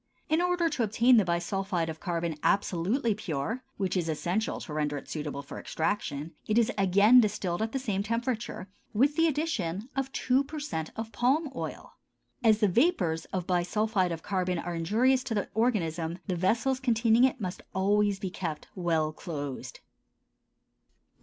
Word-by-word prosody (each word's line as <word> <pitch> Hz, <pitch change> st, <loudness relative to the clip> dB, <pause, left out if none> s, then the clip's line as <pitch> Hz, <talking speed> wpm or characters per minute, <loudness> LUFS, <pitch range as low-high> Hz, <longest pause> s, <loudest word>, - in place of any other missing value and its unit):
In 315 Hz, +2 st, +3 dB
order 355 Hz, -1 st, +2 dB
to 295 Hz, -6 st, -2 dB
obtain 230 Hz, +3 st, +4 dB
the 215 Hz, -, +5 dB
bisulphide 175 Hz, 0 st, -1 dB
of 160 Hz, -1 st, -5 dB
carbon 170 Hz, -3 st, -2 dB
absolutely 205 Hz, +5 st, +1 dB
pure, 210 Hz, -, -3 dB
which 190 Hz, -2 st, -1 dB
is 170 Hz, -3 st, 0 dB
essential 175 Hz, +8 st, -1 dB
to 155 Hz, -, -7 dB
render 150 Hz, -1 st, -1 dB
it 135 Hz, -, -9 dB
suitable 150 Hz, -2 st, -4 dB
for 140 Hz, -, -8 dB
extraction, 160 Hz, -3 st, -2 dB, 0.2 s
it 215 Hz, -, +1 dB
is 235 Hz, +1 st, +4 dB
again 200 Hz, +5 st, +6 dB
distilled 190 Hz, -4 st, -1 dB
at 220 Hz, 0 st, -1 dB
the 270 Hz, -, -1 dB
same 210 Hz, -7 st, -1 dB
temperature, 230 Hz, -2 st, -2 dB, 0.3 s
with 275 Hz, +7 st, +3 dB
the 330 Hz, +1 st, +4 dB
addition 240 Hz, -, -2 dB
of 270 Hz, 0 st, -1 dB
two 260 Hz, +1 st, +2 dB
per 300 Hz, +2 st, -7 dB
cent 160 Hz, -, -3 dB
of 225 Hz, 0 st, -5 dB
palm 275 Hz, +6 st, +1 dB
oil. -, -, -6 dB, 0.5 s
As 220 Hz, -1 st, +4 dB
the 210 Hz, -, +5 dB
vapors 180 Hz, -, +2 dB
of 185 Hz, -2 st, -4 dB
bisulphide 185 Hz, +2 st, +1 dB
of 165 Hz, -1 st, -5 dB
carbon 185 Hz, -2 st, -1 dB
are 175 Hz, +1 st, -4 dB
injurious 230 Hz, +10 st, +2 dB
to 225 Hz, -, -2 dB
the 205 Hz, -, -1 dB
organism, 175 Hz, -8 st, 0 dB
the 185 Hz, -, -1 dB
vessels 230 Hz, +9 st, +1 dB
containing 230 Hz, -2 st, +3 dB
it 260 Hz, 0 st, +3 dB
must 185 Hz, -3 st, -4 dB
always 205 Hz, +1 st, +2 dB
be 195 Hz, -2 st, -4 dB
kept 165 Hz, -5 st, -5 dB
well 165 Hz, -4 st, 0 dB
closed. 145 Hz, -5 st, -6 dB
200 Hz, 165 wpm, -29 LUFS, 170-240 Hz, 0.5 s, again